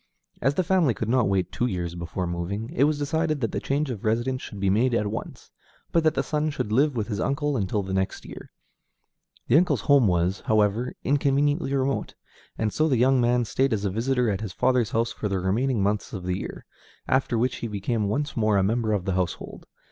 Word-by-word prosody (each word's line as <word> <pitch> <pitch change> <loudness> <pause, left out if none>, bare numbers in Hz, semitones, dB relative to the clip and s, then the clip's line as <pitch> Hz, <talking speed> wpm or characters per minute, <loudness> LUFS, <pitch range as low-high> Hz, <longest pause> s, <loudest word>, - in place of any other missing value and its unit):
As 135 +1 +2
the 185 - +2
family 170 -8 +2
could 110 - -3
not 125 -3 +3
wait 95 -2 0
two 125 - 0
years 90 -6 -3
before 85 +1 -4
moving, 90 +6 -4
it 135 - +3
was 150 0 +1
decided 155 +1 0
that 115 - -1
the - - -2
change 140 0 -1
of 110 -5 -6
residence 120 +4 0
should 105 - -8
be 95 -1 +2
made 120 +4 +2
at 105 - +1
once, 105 +2 -6 0.4
but 165 - +2
that 155 - +2
the - - +1
son 155 0 -1
should 125 -7 -3
live 140 +5 +3
with 110 -3 -2
his 105 -2 -3
uncle 145 +3 0
until 100 -2 -1
the 95 0 -5
next 95 0 -2
year. - - -10 1.0
The 130 - +5
uncle's 180 - +1
home 140 -6 +4
was, 90 +2 +1
however, 110 +3 +1
inconveniently 145 +1 +1
remote, 135 0 -1 0.4
and 110 -2 -1
so 155 - +2
the 135 -5 +2
young 130 +2 +4
man 120 0 +2
stayed 130 +3 +1
as 105 -1 -1
a 100 - 0
visitor 120 +2 +1
at 95 - -3
his 105 -5 -5
father's 120 +6 +2
house 115 +1 0
for 105 - -4
the 100 - 0
remaining 110 +5 0
months 105 +1 -1
of 95 -4 -5
the 90 +1 -2
year, - - -7 0.4
after 130 -2 +1
which 125 +2 0
he 120 - -4
became 105 +1 -1
once 145 +8 -2
more 110 -3 +2
a 95 - +3
member 110 +2 +1
of 95 -3 -1
the 95 - 0
household. 90 -1 -3
115 Hz, 225 wpm, -25 LUFS, 100-135 Hz, 1.0 s, The